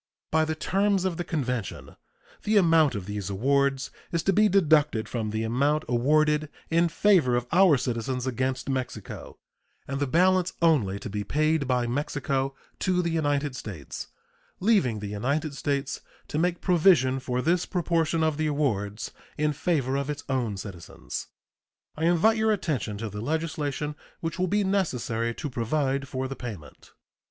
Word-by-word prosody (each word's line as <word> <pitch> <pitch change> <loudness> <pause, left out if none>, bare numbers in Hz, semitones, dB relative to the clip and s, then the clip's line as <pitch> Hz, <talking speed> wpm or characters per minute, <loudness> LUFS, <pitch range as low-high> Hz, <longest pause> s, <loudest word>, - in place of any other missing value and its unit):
By 160 0 +3
the 160 0 -2
terms 195 +3 +1
of 180 -3 -1
the 175 - -2
convention 125 - -3 0.5
the 215 0 +2
amount 165 - +4
of 100 -3 -4
these 100 -1 -4
awards 135 +6 +1 0.2
is 170 -2 0
to 195 - +2
be 210 +2 +4
deducted 155 - +3
from 115 -3 -3
the 110 +1 -2
amount 140 +7 +1
awarded 150 +5 +2 0.2
in 170 +1 +3
favor 165 -7 +3
of 120 0 0
our 180 -4 +6
citizens 125 0 -2
against 130 +1 -2
Mexico, 130 -2 -5 0.5
and 135 0 -3
the 145 - 0
balance 185 +5 +3
only 140 - +3
to 120 - -7
be 105 0 -3
paid 155 +2 +1
by 125 -2 +1
Mexico 135 +1 -1 0.2
to 180 -1 +1
the 170 - -1
United 145 -3 0
States, 95 - -7 0.5
leaving 180 - +2
the - - -4
United 140 +9 -1
States 140 -2 -2 0.3
to 150 - -1
make 175 +1 0
provision 160 -8 +4
for 125 -1 -2
this 175 +2 +1
proportion 165 -3 +1
of 155 -2 +1
the 155 0 0
awards 110 -8 -1 0.3
in 150 0 +1
favor 135 -4 0
of 140 +1 -2
its 145 -1 -4
own 120 -7 -1
citizens. 95 -3 -7 0.7
I 160 - -1
invite 175 +7 +4
your 220 0 +2
attention 150 - -1
to 110 +1 -4
the 105 +1 -6
legislation 150 +1 -2 0.3
which 165 +2 -4
will 185 - +2
be 205 +3 +1
necessary 125 - -1
to - - -4
provide 140 +2 -1
for 130 +1 -3
the 135 - -5
payment. 105 - -9
145 Hz, 165 wpm, -27 LUFS, 125-165 Hz, 0.7 s, our